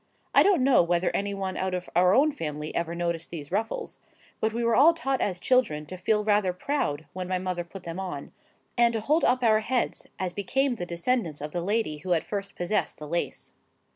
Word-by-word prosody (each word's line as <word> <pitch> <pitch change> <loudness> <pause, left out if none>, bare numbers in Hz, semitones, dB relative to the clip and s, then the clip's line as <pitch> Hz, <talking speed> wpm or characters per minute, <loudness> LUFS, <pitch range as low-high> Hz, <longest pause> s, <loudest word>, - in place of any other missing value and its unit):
I - - +7
don't 385 -9 +4
know 270 -1 +6
whether 175 +1 +1
any 200 0 -1
one 190 -1 -3
out 190 -1 -1
of 180 0 -5
our 180 +2 +5
own 300 +4 +5
family 150 - -5
ever 170 0 -2
noticed 170 -1 -2
these 150 -3 -7
ruffles,—but 220 +1 -4
we 235 +2 -2
were 230 0 +3
all 325 +5 +6
taught 270 -5 -1
as 185 -3 0
children 180 -12 +2
to 185 - -8
feel 210 +4 +1
rather 205 -3 +2
proud 180 - -2
when 185 -1 -4
my 185 0 0
mother 180 -1 -2
put 175 +2 -11
them 170 +2 -5
on, 180 -7 -5 0.4
and 235 -1 +4
to 225 - 0
hold 300 +9 +1
up 250 0 +3
our 215 -2 +5
heads 240 +3 -1
as 185 -2 -3
became 265 +8 0
the 175 - -4
descendants 170 - -1
of 150 +1 -5
the 175 - -2
lady 195 -5 -1
who 180 +4 0
had 165 - 0
first 200 -2 -4
possessed 180 +4 -1
the 150 - -8
lace. 170 +3 -3
190 Hz, 215 wpm, -27 LUFS, 170-230 Hz, 0.4 s, I